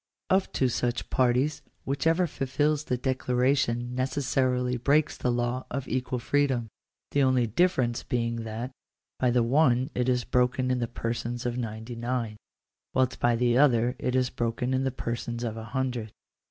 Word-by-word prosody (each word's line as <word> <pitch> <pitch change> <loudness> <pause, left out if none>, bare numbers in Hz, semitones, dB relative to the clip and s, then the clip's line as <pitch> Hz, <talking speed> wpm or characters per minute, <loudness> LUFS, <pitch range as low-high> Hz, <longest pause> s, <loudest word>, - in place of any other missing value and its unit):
Of 190 0 +3
two 130 - +2
such 120 0 -2
parties, 130 +4 +2 0.2
whichever 160 +6 +2
fulfils 145 +1 0
this 125 - 0
decla 125 -1 -1
ration 125 -2 +1
necessarily 130 -1 0
breaks 145 +5 +2
the 125 - 0
law 120 +1 -1
of 135 +1 -4
equal 125 0 -1
freedom: 130 -2 0 0.4
the 145 - +2
only 130 -2 +3
difference 120 - +1
being 115 -1 -1
that 115 +2 -5 0.5
by 125 - +3
the 120 0 +3
one 130 +1 +3
it 125 0 0
is 125 -1 +1
broken 125 +1 +1
in 125 - +1
the 120 - -1
persons 120 +1 -3
of 120 -1 -1
ninety 115 +1 -5
nine, 115 -2 -2 0.6
whilst 130 -1 +1
by 120 0 +3
the 120 +1 +2
other 125 -3 +4
it 125 - -1
is 130 -1 +2
broken 120 +1 -1
in 130 +1 +1
the - - +2
persons 120 -1 -4
of 115 -2 -2
a 110 0 -7
hundred. 120 -2 -2
125 Hz, 165 wpm, -27 LUFS, 120-130 Hz, 0.6 s, other